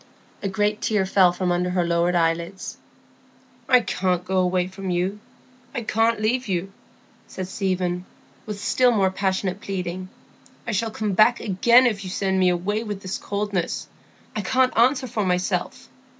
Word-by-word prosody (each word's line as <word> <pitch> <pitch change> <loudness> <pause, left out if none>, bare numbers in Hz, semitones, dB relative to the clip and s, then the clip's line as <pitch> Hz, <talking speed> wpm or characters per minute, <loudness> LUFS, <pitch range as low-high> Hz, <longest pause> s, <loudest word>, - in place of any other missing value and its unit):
A 195 - -2
great 210 +2 0
tear 210 -3 +1
fell 190 -1 +4
from 180 0 -1
under 180 +1 0
her 180 -1 +1
lowered 170 +1 +1
eyelids. 170 +2 -1 0.9
"I 250 -2 +6
can't 180 -4 -1
go 190 +1 -1
away 180 0 +1
from 190 +1 -6
you; 180 +3 -1 0.6
I 240 - -2
can't 225 +1 +1
leave 245 +4 0
you," 190 0 -2 0.6
said 185 -1 -6
Stephen, 185 -2 -2 0.4
with 210 -1 -5
still 250 +4 +3
more 195 -5 +2
passionate 190 0 -1
pleading. 185 -1 -4 0.6
"I 235 - -2
shall 225 +2 0
come 215 -1 -2
back 215 +5 +4
again 235 +5 +4
if 210 -5 0
you 185 - -6
send 190 0 0
me 185 -1 +4
away 195 +5 -1
with 205 -3 -5
this 185 0 -4
coldness; 200 -3 -2 0.5
I 215 - -1
can't 255 +5 +2
answer 260 +3 +3
for 215 -3 -2
myself. 180 +6 -1
190 Hz, 165 wpm, -23 LUFS, 180-215 Hz, 0.9 s, I